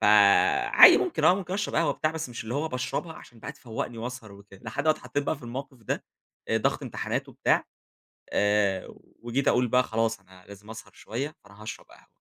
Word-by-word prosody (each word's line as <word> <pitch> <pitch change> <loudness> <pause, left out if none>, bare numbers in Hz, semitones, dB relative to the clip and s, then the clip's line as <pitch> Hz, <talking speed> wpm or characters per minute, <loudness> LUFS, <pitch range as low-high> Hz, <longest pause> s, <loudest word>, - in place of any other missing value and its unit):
فعادي 105 -1 +7
ممكن - - -1
آه، 180 - +7
ممكن 185 -1 -4
أشرب 205 +1 -2
قهوة 165 - +2
بتاع 155 - -1
بس 160 -3 -5
مش 120 -1 -7
اللي 115 +2 -5
هو 155 +3 -1
باشربها 130 +6 -3
عشان 120 -6 -15
بقى 140 - -6
تفوقني 120 -3 -6
وأسهر 115 -2 -7
وكده، 100 -1 -16
لحد 115 +6 -4
ما 155 - +5
اتحطيت 145 -2 -2
بقى - - -1
في 140 - -17
الموقف 130 +3 -7
ده، - - -3 0.4
آآ - - +2
ضغط - - 0
امتحانات - - -3
وبتاع - - +1 0.7
آآ 105 -2 +1 0.3
وجيت 120 +4 -1
أقول 125 0 +3
بقى 125 +2 +4
خلاص 115 -2 -1
أنا 95 -1 -19
لازم 100 +1 -12
أسهر 110 - -10
شوية 140 +7 -5
فأنا 100 +1 -16
هاشرب 110 - -8
قهوة، - - -19
120 Hz, 195 wpm, -27 LUFS, 105-140 Hz, 0.7 s, فعادي